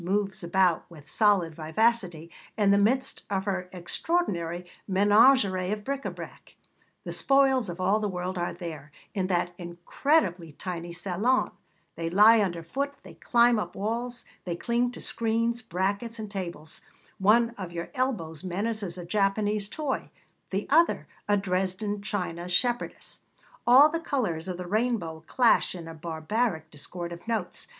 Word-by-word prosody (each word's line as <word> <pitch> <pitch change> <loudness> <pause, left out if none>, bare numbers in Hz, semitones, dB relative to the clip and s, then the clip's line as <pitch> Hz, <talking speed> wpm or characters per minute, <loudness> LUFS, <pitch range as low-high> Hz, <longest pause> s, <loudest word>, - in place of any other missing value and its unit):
moves 195 0 -1
about 175 -1 +2
with 155 -4 -13
solid 200 -7 +3
vivacity 170 +1 0 0.3
in 205 -2 +4
the 200 - +5
midst 260 +6 +1
of 195 -1 -1
her 190 -2 -2
extraordinary 180 - -2 0.2
menagerie 205 -1 +4
of 210 0 -3
bric 275 +2 -3
à - - -5
brac. - - -11 0.5
The - - -5
spoils 270 -5 +3
of 175 +1 -6
all 195 +4 +2
the 210 -1 -1
world 180 0 -3
are 175 -1 -1
there, 160 -5 -8 0.2
in 190 -2 -1
that 175 -1 0
incredibly 175 - 0
tiny 175 0 -5
salon; 200 +9 0 0.4
they 165 0 -3
lie 210 +5 +7
underfoot, 200 - -2
they - - -12
climb 235 -1 +3
up 175 -4 -5
walls, 235 +4 -3 0.2
they 175 -2 -3
cling 240 +5 0
to - - -9
screens, 230 +1 0
brackets, 200 +4 -2
and 215 -2 -6
tables; 170 -5 -6 0.4
one 230 +4 +4
of 190 -7 -7
your 170 0 -5
elbows 215 - -2
menaces 200 0 -2
a 175 - -7
Japanese 205 +2 +1
toy, 295 -1 -3 0.4
the 195 +2 -2
other 335 +3 +4 0.2
a 205 0 +3
Dresden 195 +2 -1
china 180 -4 -3
shepherdess; 240 +6 -1 0.5
all 260 +5 +9
the 330 +2 -2
colours 210 - -2
of 180 -2 -4
the 180 - -6
rainbow 200 -6 -1
clash 240 -6 +3
in 170 -2 -8
a 165 - -7
barbaric 160 +2 -2
discord 170 +4 -6
of 170 +4 -10
notes. 220 -6 -2
195 Hz, 150 wpm, -27 LUFS, 175-230 Hz, 0.5 s, all